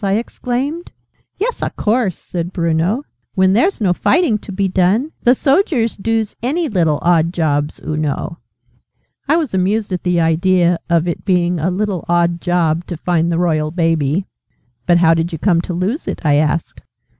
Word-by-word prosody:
I 195 -1 +1
exclaimed. 250 +8 -3 0.5
"Yes, 470 +5 -2
a - - 0
course!" 215 -4 0
said 175 0 -5
Bruno. 170 - 0 0.3
"When 190 -1 +3
there's 300 - +2
no 190 -5 +2
fighting 240 - +2
to 205 - -10
be 195 0 0
done, 190 - +1
the 245 +2 +4
soldiers 270 - +1
doos 225 +1 -2
any 310 +8 0
little 165 - +1
odd 170 -1 +3
jobs, 150 -4 -1
oo 155 - -2
know." 155 +2 -3 0.9
I 305 +4 +3
was 310 -10 -2
amused 200 +3 0
at 180 - -2
the 180 -1 +1
idea 175 +1 +2
of 170 0 +2
its 170 - -3
being 180 -3 +1
a 165 +4 0
'little 190 -1 -2
odd 170 0 +1
job' 175 -2 0
to 175 - -5
find 170 0 0
the 165 - 0
Royal 155 -3 +1
Baby. 165 0 0 0.6
"But 175 -1 +5
how 165 -1 +5
did 165 +1 -1
you 165 - -4
come 170 0 +2
to 175 - -5
lose 200 - -2
it?" - - -3
I 145 -1 +4
asked. 155 +2 -1
180 Hz, 180 wpm, -17 LUFS, 165-215 Hz, 0.9 s, But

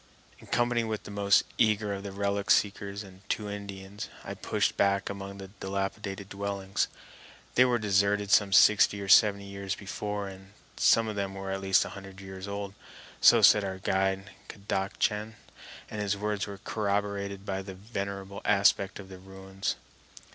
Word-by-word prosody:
In - - -15
company 120 -1 +1
with 110 -1 -3
the - - -9
most 100 0 +4 0.2
eager 105 -2 +2
of 100 - -5
the 100 0 -6
relic 100 0 -2
seekers 100 0 +1
and 95 -1 -14
two 105 - -1
Indians, 100 0 -7
I - - -5
pushed - - -1
back 100 0 +1
among 100 0 -7
the 95 -1 -9
dilapidated 100 0 -4
dwellings. 100 -1 -2 0.7
They 125 - +6
were 125 -1 +2
deserted 100 -1 +1
some 100 -2 +5
sixty 100 +1 +6
or 100 - -5
seventy 100 0 +6
years 100 0 -4
before, 105 0 -4
and 95 +1 -12 0.2
some 115 -1 +4
of 105 - -4
them 100 -1 -3
were 95 0 -5
at 95 0 -3
least 95 0 +3
a - - -6
hundred 95 -1 -10
years 95 0 -8
old. 100 0 -5 0.5
So - - +7
said 105 - +7
our 95 -1 -3
guide, 95 0 0 0.2
Kadachan, 105 +2 -2 0.5
and 105 - -5
his 100 -1 0
word 105 0 -2
was 100 0 -8
corroborated 100 -2 -2
by 95 -1 -2
the 95 -1 -8
venerable 100 -1 -5
aspect 100 -1 +3
of 100 - -10
the 95 -1 -11
ruins. 95 0 -5
100 Hz, 170 wpm, -29 LUFS, 95-105 Hz, 0.7 s, So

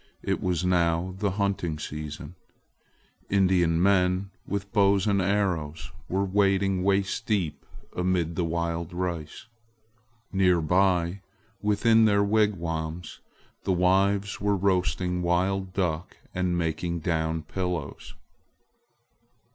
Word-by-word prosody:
It - - -1
was 90 -1 0
now 85 0 +1
the 100 -1 +1
hunting 95 -5 -1
season. 75 +1 -7 1.0
Indian 90 -4 +3
men, 95 0 +2 0.2
with 100 0 -4
bows 100 -2 +3
and 100 -2 +2
arrows, 90 -6 -1 0.2
were 95 +2 0
wading 95 -1 +2
waist 100 +3 0
deep 95 -8 -1 0.3
amid 90 -2 0
the 90 - 0
wild 85 +1 -2
rice. 85 -3 -4 0.9
Near 90 -2 +3
by, 90 +2 +1 0.4
within 110 +2 +4
their 100 -1 +3
wigwams, 85 -6 -1 0.4
the 95 - +1
wives 95 +3 +2
were 100 0 +1
roasting 90 -1 0
wild 95 +2 0
duck 90 -2 -2 0.2
and 90 -1 0
making 85 0 -2
down 80 0 -1
pillows. 90 -2 -4
90 Hz, 105 wpm, -26 LUFS, 85-100 Hz, 1.0 s, within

